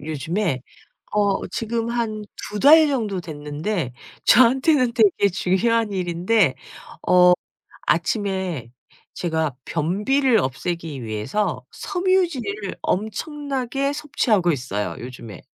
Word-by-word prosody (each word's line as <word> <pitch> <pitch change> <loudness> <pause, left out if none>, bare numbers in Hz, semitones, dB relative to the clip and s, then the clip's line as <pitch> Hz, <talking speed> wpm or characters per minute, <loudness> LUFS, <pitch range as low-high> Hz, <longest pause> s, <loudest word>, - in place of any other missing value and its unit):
요즘에 160 +1 -2 0.5
어 205 -2 +1
지금 230 +2 -2
한 220 -3 -2 0.3
2 210 - -3
달 310 +4 +7
정도 215 -9 -1
됐는데 150 - -4 0.3
저한테는 255 +1 +5
되게 205 -3 +3
중요한 210 +4 +1
일인데 180 - +1 0.5
어 180 0 +7 0.5
아침에 185 - -1 0.4
제가 160 -6 -1
변비를 215 - +1
없애기 160 -1 -3
위해서 125 - -2
섬유질을 335 - -1
엄청나게 275 - -2
섭취하고 255 - +1
있어요 120 -7 -3
요즘에. 120 -5 -9
200 Hz, 225 characters per minute, -22 LUFS, 160-235 Hz, 0.5 s, 달